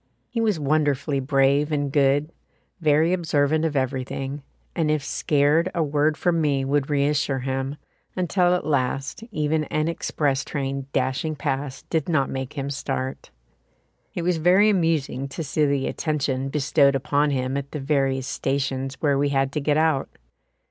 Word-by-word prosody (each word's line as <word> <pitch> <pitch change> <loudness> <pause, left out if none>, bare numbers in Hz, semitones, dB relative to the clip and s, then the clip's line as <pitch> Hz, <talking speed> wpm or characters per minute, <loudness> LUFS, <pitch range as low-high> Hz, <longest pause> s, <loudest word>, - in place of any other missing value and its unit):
He 230 -2 -2
was 210 -7 +1
wonderfully 145 -1 +1
brave 135 +2 +2
and 145 -2 -1
good, 145 +2 +2 0.5
very 155 +1 +3
observant 155 -3 +1
of 155 -2 -1
everything, 135 +1 -2 0.3
and 160 -3 +1
if 155 -2 +1
scared 150 +4 +2
a 165 - +2
word 150 +1 +1
from 170 -2 +1
me 140 -3 +1
would 140 +1 0
reassure 145 -1 +1
him, 135 +2 -2 0.4
until 180 0 +2
at 180 - -3
last 135 - -1
even 155 -4 0
an 155 +1 -1
express 145 -4 -1
train 135 -1 -4
dashing 135 +4 -1
past 140 -2 -4
did 160 -1 0
not 140 -5 +1
make 130 +1 -4
him 140 -1 -4
start. 130 -1 -4 0.9
It 175 - -2
was 175 -1 +1
very 185 +6 +5
amusing 160 -7 0
to 150 +4 -5
see 150 +1 +1
the 140 -1 0
attention 135 -4 -1
bestowed 140 -1 +3
upon 145 +2 +1
him 130 -1 -1
at 140 0 -3
the 150 - -5
various 135 -2 0
stations 135 -1 -2
where 145 -3 +2
we 145 0 +2
had 135 -1 +1
to 150 - -2
get 145 +1 +1
out. 155 -3 +1
145 Hz, 160 wpm, -24 LUFS, 135-155 Hz, 0.9 s, very